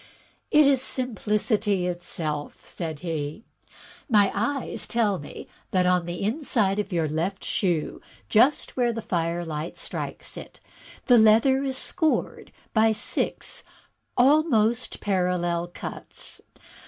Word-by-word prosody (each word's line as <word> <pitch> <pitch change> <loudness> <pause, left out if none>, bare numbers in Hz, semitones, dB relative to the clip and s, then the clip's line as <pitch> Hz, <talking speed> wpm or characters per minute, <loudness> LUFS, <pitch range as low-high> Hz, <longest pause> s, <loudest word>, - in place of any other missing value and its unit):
"It 300 0 +6
is 270 -2 +4
simplicity 215 -5 0
itself," 165 -4 -4
said 160 -4 -5
he; 160 +2 -4 0.7
"my 205 -4 +4
eyes 250 +6 -2
tell 215 -5 +1
me 145 - -9 0.2
that 185 -1 +2
on 180 -1 +2
the 175 +2 -4
inside 215 -4 +1
of 205 -1 -3
your 165 -3 +1
left 170 +6 -2
shoe, 175 -6 -1 0.3
just 255 +7 +3
where 245 -2 +2
the 225 -1 -5
fireUght 165 -3 -2
strikes - - -5
it, - - -10 0.5
the 245 -2 +6
leather 225 +5 +5
is 265 -1 0
scored 320 +1 0 0.2
by 220 0 +4
six - - -2 0.5
almost 250 -4 +3
parallel 180 -3 0
cuts. 175 - -6
205 Hz, 115 wpm, -25 LUFS, 175-240 Hz, 0.7 s, It